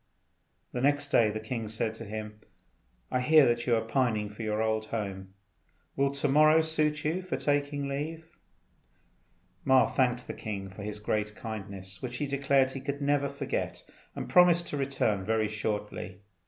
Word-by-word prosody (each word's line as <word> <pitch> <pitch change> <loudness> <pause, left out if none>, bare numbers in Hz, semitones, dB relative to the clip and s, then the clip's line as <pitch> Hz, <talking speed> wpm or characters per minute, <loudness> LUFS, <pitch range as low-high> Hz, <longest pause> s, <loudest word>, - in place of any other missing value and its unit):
The 125 - -3
next 145 +1 +2
day 115 -5 +4
the 105 +1 -3
king 110 0 -4
said 110 0 -2
to 115 +1 -9
him, 105 0 -6 0.7
"I 125 - +1
hear 155 +2 +6
that 120 0 +1
you 120 - +4
are 110 - +1
pining 110 -3 0
after 105 - -9
your 110 -1 -1
old 110 0 0
home. 95 -4 -5 0.6
Will 140 0 +2
to 140 +1 -1
morrow 155 +3 +6
suit 155 -2 0
you 165 +5 0
for 185 - -3
taking 145 -1 0
leave?" 155 +4 -4 1.4
Ma 130 -3 +5
thanked 125 -2 0
the - - -5
king 100 -3 -5
for 95 - -10
his 105 0 -5
great 105 0 -2
kindness, 100 -4 -7
which 125 -1 -4
he 145 - -1
declared 140 -1 +2
he 135 - -6
could 140 +1 -3
never 140 0 +1
forget, 140 -1 -4 0.3
and - - -4
promised 175 -1 +5
to - - -3
return 130 -8 0
very 110 +1 +1
shortly. 105 -2 -4
125 Hz, 170 wpm, -29 LUFS, 105-140 Hz, 1.4 s, hear